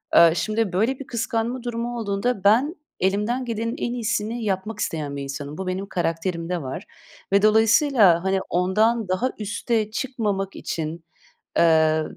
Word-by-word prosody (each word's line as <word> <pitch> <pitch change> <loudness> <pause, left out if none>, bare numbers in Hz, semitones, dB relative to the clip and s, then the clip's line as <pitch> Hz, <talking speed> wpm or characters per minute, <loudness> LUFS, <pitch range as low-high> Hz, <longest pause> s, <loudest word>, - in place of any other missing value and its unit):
Eee, 170 -1 +8
şimdi 215 -2 -1
böyle 230 +8 +1
bir 275 - -8
kıskanma 235 +1 -2
durumu 240 0 -3
olduğunda 200 0 -1
ben, 250 - +4 0.2
elimden 210 +7 0
gelenin 230 0 -2
en 240 - -2
iyisini 230 0 -2
yapmak 205 +2 -2
isteyen 150 -3 -3
bir 140 - -4
insanım. 140 +2 -6
Bu, 190 -1 -5
benim 185 +2 -2
karakterimde 170 -1 -2
var 135 +8 -5 0.5
ve 200 - +5
dolayısıyla, 220 - +5
hani, 190 0 +1
ondan 215 +5 +2
daha 185 +8 0
üste 215 +1 -1
çıkmamak 210 -7 -2
için, 160 +1 -5 0.5
eee, 160 -1 +4
205 Hz, 145 wpm, -23 LUFS, 180-230 Hz, 0.5 s, Eee